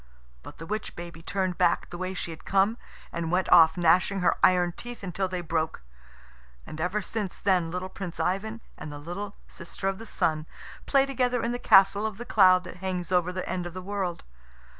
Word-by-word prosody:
But -, -, -12 dB
the 165 Hz, -, -8 dB
witch 215 Hz, +4 st, -4 dB
baby 170 Hz, -1 st, -8 dB
turned 185 Hz, 0 st, -2 dB
back 175 Hz, -2 st, +2 dB
the 175 Hz, -, -6 dB
way 185 Hz, 0 st, -3 dB
she 175 Hz, -, -4 dB
had 160 Hz, -, -10 dB
come, 200 Hz, +4 st, +2 dB, 0.3 s
and 170 Hz, -1 st, -3 dB
went 185 Hz, +1 st, +1 dB
off, 160 Hz, -1 st, +7 dB
gnashing 180 Hz, +3 st, +3 dB
her 180 Hz, -, +3 dB
iron 180 Hz, -1 st, +4 dB
teeth 240 Hz, +5 st, -9 dB
until 190 Hz, +1 st, -2 dB
they 180 Hz, -1 st, -4 dB
broke. 160 Hz, -, -2 dB, 0.8 s
And 155 Hz, -, -7 dB
ever 190 Hz, +4 st, -1 dB
since 210 Hz, -3 st, -4 dB
then 185 Hz, -4 st, +2 dB
little 180 Hz, +2 st, -4 dB
Prince 185 Hz, -2 st, -7 dB
Ivan 220 Hz, +5 st, -1 dB, 0.2 s
and 150 Hz, -, -7 dB
the 145 Hz, -, -7 dB
little 180 Hz, +7 st, -6 dB
sister 180 Hz, +2 st, -6 dB
of 195 Hz, 0 st, -1 dB
the 225 Hz, -, -9 dB
Sun 155 Hz, -5 st, -1 dB, 0.4 s
play 275 Hz, -1 st, +4 dB
together 250 Hz, -2 st, 0 dB
in 230 Hz, -, 0 dB
the 245 Hz, -, -3 dB
castle 195 Hz, +1 st, +5 dB
of 215 Hz, -3 st, -7 dB
cloud 185 Hz, -3 st, +5 dB
that 180 Hz, -, -10 dB
hangs 180 Hz, -1 st, -4 dB
over 180 Hz, -1 st, +2 dB
the 185 Hz, 0 st, -4 dB
end 180 Hz, -1 st, -3 dB
of 175 Hz, -, -10 dB
the 185 Hz, -, -5 dB
world. 190 Hz, -3 st, -3 dB
185 Hz, 205 wpm, -27 LUFS, 175-200 Hz, 0.8 s, off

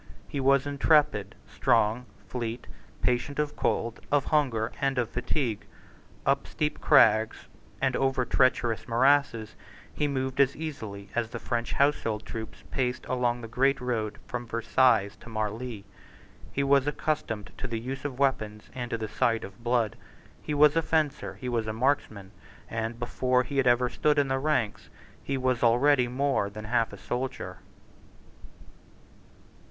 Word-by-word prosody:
He 140 Hz, -, -4 dB
was 135 Hz, 0 st, +3 dB
intrepid, 145 Hz, -, +2 dB
strong, 115 Hz, +4 st, +1 dB, 0.2 s
fleet, 120 Hz, -1 st, -4 dB, 0.4 s
patient 125 Hz, +3 st, 0 dB
of 150 Hz, -1 st, -1 dB
cold, 115 Hz, 0 st, -1 dB
of 145 Hz, -2 st, +3 dB
hunger, 125 Hz, -8 st, +1 dB
and 135 Hz, -1 st, +1 dB
of 120 Hz, -2 st, 0 dB
fatigue. 125 Hz, -2 st, -2 dB, 0.6 s
Up 140 Hz, 0 st, +1 dB
steep 150 Hz, -1 st, -2 dB
crags, 110 Hz, -6 st, +4 dB, 0.3 s
and 130 Hz, -2 st, +1 dB
over 135 Hz, -2 st, +1 dB
treacherous 120 Hz, -3 st, +1 dB
morasses, 125 Hz, -2 st, +2 dB, 0.4 s
he 150 Hz, -, 0 dB
moved 130 Hz, -1 st, -2 dB
as 140 Hz, 0 st, +4 dB
easily 110 Hz, -11 st, -6 dB
as 115 Hz, -2 st, -1 dB
the -, -, -5 dB
French 120 Hz, -1 st, -2 dB
household 115 Hz, -7 st, +1 dB
troops 110 Hz, +1 st, -7 dB
paced 125 Hz, -1 st, -1 dB
along 120 Hz, -1 st, 0 dB
the 115 Hz, -, -7 dB
great 135 Hz, +4 st, +2 dB
road 115 Hz, -4 st, -2 dB
from 120 Hz, -1 st, -5 dB
Versailles 115 Hz, -2 st, +3 dB
to -, -, -12 dB
Marli. 110 Hz, 0 st, -4 dB, 0.7 s
He 140 Hz, -, 0 dB
was 140 Hz, 0 st, +3 dB
accustomed 115 Hz, -10 st, -2 dB
to 130 Hz, -, -3 dB
the 115 Hz, -2 st, -3 dB
use 130 Hz, +4 st, -5 dB
of 140 Hz, -3 st, -4 dB
weapons 110 Hz, -6 st, -1 dB
and 125 Hz, -2 st, -4 dB
to 115 Hz, -, -1 dB
the 110 Hz, -1 st, -4 dB
sight 115 Hz, +1 st, +1 dB
of 95 Hz, +4 st, -11 dB
blood: 120 Hz, -3 st, +1 dB, 0.5 s
he 150 Hz, -, -3 dB
was 150 Hz, +1 st, +6 dB
a 165 Hz, -, +4 dB
fencer; 155 Hz, -3 st, -1 dB
he 125 Hz, -, -7 dB
was 115 Hz, -3 st, -1 dB
a 110 Hz, -, -2 dB
marksman; 110 Hz, -6 st, -1 dB, 0.4 s
and, 115 Hz, +1 st, -3 dB
before 125 Hz, +1 st, +1 dB
he 135 Hz, +3 st, -5 dB
had 135 Hz, -2 st, +3 dB
ever 120 Hz, +1 st, +4 dB
stood 150 Hz, +4 st, +1 dB
in 140 Hz, -2 st, +2 dB
the 135 Hz, 0 st, +1 dB
ranks, 135 Hz, -7 st, -1 dB, 0.3 s
he 140 Hz, -, -2 dB
was 130 Hz, -2 st, 0 dB
already 125 Hz, +2 st, +4 dB
more 130 Hz, -4 st, 0 dB
than 110 Hz, +1 st, -8 dB
half 115 Hz, 0 st, +1 dB
a -, -, -9 dB
soldier. 125 Hz, +2 st, -4 dB
125 Hz, 155 wpm, -28 LUFS, 115-140 Hz, 0.7 s, was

